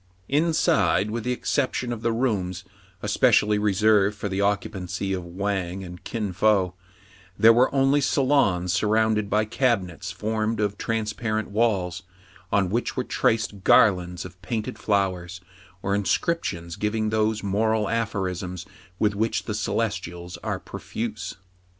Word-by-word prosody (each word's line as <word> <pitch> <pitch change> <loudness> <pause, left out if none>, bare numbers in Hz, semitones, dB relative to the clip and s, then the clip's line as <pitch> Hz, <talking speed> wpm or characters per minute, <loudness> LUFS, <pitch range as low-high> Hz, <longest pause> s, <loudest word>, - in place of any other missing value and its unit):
Inside, 150 -8 +2
with 115 0 -3
the 125 - 0
exception 125 -1 -1
of 115 - -6
the 115 0 +1
rooms 100 -7 -1 0.4
espe - - +3
cially 105 0 +3
reserved 105 0 +3
for 100 - -3
the 95 +1 -1
occupancy 95 -2 -1
of 90 -2 -3
Wang 95 +1 -3
and 90 -1 -10
Kin 105 -5 -3
Fo, 95 -1 +2 0.6
there 115 +1 +7
were 125 +3 +4
only 135 +1 +3
salons 130 - +2
surrounded 105 +1 +2
by 105 +1 +2
cabi 115 -3 +1
nets 90 +2 -8
formed 110 +2 -2
of 105 -1 0
transparent 110 -1 -2
walls, 100 -5 0 0.5
on 95 -3 +2
which 120 +5 -1
were 130 - +1
traced 110 -5 0
garlands 90 -5 +4
of 90 +1 -12
painted 110 +3 -4
flowers, 95 -4 -1 0.4
or 100 - 0
inscriptions 100 - -1
giving 110 +1 0
those 110 0 +1
moral 105 +2 +1
aphorisms 95 -5 -2 0.3
with 105 +1 +2
which 110 +1 0
the 110 - -4
Celestials 95 -5 -3
are - - -3
profuse. 110 -4 -5
105 Hz, 140 wpm, -25 LUFS, 95-110 Hz, 0.6 s, there